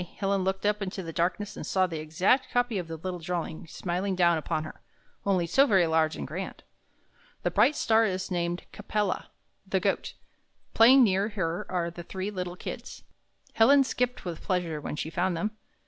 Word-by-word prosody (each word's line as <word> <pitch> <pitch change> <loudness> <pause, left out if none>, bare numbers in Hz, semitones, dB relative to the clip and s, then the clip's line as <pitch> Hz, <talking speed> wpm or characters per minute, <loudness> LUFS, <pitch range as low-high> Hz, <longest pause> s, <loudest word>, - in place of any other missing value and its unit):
Helen 195 -1 0
looked 190 +1 -1
up 210 0 +1
into 190 -1 -4
the 165 -1 -6
darkness 185 +5 -1
and - - -6
saw 190 -1 +2
the 165 -3 -4
exact 180 - +1
copy 245 -4 +1
of 175 - -5
the 165 0 -6
little 180 +2 -5
di'awing 170 -1 -4
smiling 185 +2 -2
down 175 -2 +4
upon 155 0 -2
her 155 - -10 0.2
— - - -37
only 185 -3 +2
so 270 - +4
very 190 -7 +4
large 160 -1 +2
and - - -5
grand. 175 +7 -6 0.8
"The - - +1
bright 300 - +4
star 225 -3 +3
is 185 -1 -2
named 175 0 -1
Ca - - -10
pel' 210 0 0
la, - - -2 0.4
the - - +1
Goat. - - -1 0.6
Playing 255 +4 +7
near 200 -1 +2
her 175 -5 -2
are 170 -2 -1
the 175 - -8
three 190 +3 -5
little 180 -2 -4
Kids." - - -7 0.5
Helen 275 +5 +6
skipped 250 -3 -2
with 170 -3 -5
pleasure 175 -5 -1
when 145 - -4
she 155 +2 -4
found 175 +1 0
them. 210 +6 -1
185 Hz, 195 wpm, -28 LUFS, 170-210 Hz, 0.8 s, Playing